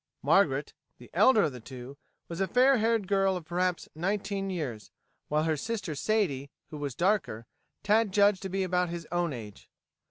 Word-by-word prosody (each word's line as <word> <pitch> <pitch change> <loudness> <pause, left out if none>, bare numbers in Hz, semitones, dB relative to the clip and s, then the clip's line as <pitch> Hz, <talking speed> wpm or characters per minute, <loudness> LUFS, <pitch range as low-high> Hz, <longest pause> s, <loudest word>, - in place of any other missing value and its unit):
Margaret, - - +2 0.2
the - - -15
elder 250 -6 +5
of - - +1
the 125 - -9
two, 130 +2 -10 0.3
was 170 +2 -5
a 195 - +1
fair 255 +6 +4
haired 225 -2 +1
girl 195 -1 +2
of 170 - -9
perhaps 180 +1 -1
nineteen 195 +3 -2
years, 140 - -4 0.4
while 150 +1 +1
her 160 -1 +1
sister 205 +1 -4
Sadie, 145 -6 0 0.2
who 155 - -6
was 140 -4 -4
darker, 175 - 0 0.4
Tad 215 0 +3
judged 200 -1 +4
to 190 - -5
be 190 +1 -1
about 180 -1 0
his 170 -1 -5
own 175 -2 0
age. 110 -6 -9
180 Hz, 180 wpm, -29 LUFS, 150-205 Hz, 0.4 s, elder